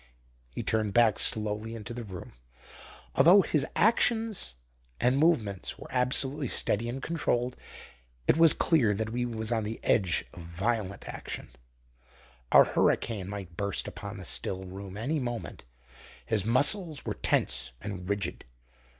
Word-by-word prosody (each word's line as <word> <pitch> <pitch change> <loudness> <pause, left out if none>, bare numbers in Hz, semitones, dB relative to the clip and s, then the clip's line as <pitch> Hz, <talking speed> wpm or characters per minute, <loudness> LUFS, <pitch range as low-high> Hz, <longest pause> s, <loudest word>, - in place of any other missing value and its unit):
He - - -6
turned 110 -2 0
back 115 -4 +4
slowly 110 +1 0
into 115 +2 -7
the 120 0 -6
room. 95 -5 -9 0.8
Although 175 +9 +7
his 150 -5 0
actions 225 - +2 0.4
and 125 +2 +3
movements 120 - +1
were - - -11
absolutely 130 +3 +1
steady 115 +1 +1
and 130 +2 -5
controlled, 125 -7 -1 0.7
it - - +5
was 165 -1 +7
clear 125 -11 +2
that 110 +2 -2
he 120 0 -1
was 110 -1 -3
on 115 -2 +1
the 110 +2 -5
edge 95 -6 +2
of 85 - -10
violent 100 +4 -3
action. - - -7 1.0
A - - +9
hurricane 100 -5 0
might 95 -4 -7
burst 100 0 -1
upon 100 0 -7
the 95 - -8
still 95 +3 -2
room 95 +1 -8
any 140 +8 -1
moment. 120 - -5 0.6
His 105 -4 0
muscles 145 - +2
were - - -2
tense 65 +1 0
and 90 0 -6
rigid. 100 -3 -2
110 Hz, 140 wpm, -29 LUFS, 100-130 Hz, 1.0 s, A